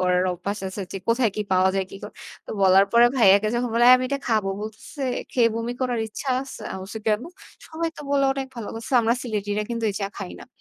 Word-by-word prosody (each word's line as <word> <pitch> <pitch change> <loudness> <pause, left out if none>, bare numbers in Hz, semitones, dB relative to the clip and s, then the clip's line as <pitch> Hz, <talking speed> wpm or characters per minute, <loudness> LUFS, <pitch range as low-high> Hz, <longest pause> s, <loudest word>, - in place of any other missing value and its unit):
করার 180 0 +2
অভ্যাস 195 +4 -4
আছে 195 +1 -5
যে - - -4
কোথায় 230 -1 +3
কি 210 - 0
পাওয়া 185 0 +4
যায়, 195 - 0
কি - - -8
করা। 210 - -9 0.3
তো - - -8
বলার 190 +1 +6
পরে 235 +1 +7
ভাইয়াকে 200 -2 +5
যখন 245 0 0
বলে 235 - +4
"এই 250 - +10
আমি 255 - -2
এটা 280 +1 -1
খাবো" 215 -4 +1
বলতেছে, 220 +6 -7 0.3
"খেয়ে 235 -2 +4
বমি 230 +1 -2
করার 245 -3 0
ইচ্ছা 220 +6 -7
আছে?" 270 - -10
আমি 190 - -6
বলছি 210 +3 -7
"কেন? 215 +2 +2 0.4
সবাই 330 +1 -3
তো - - -9
বললো 275 -1 +3
অনেক 270 -1 -3
ভালো" 230 - -5
বলতেছে, 225 +4 -4
"আমরা 230 +1 +2
সিলেটিরা 210 -3 -2
কিন্তু 230 -1 -2
এই - - -7
চা 195 - 0
খাই 190 -2 -6
না।" - - -11
220 Hz, 240 wpm, -24 LUFS, 200-245 Hz, 0.4 s, এই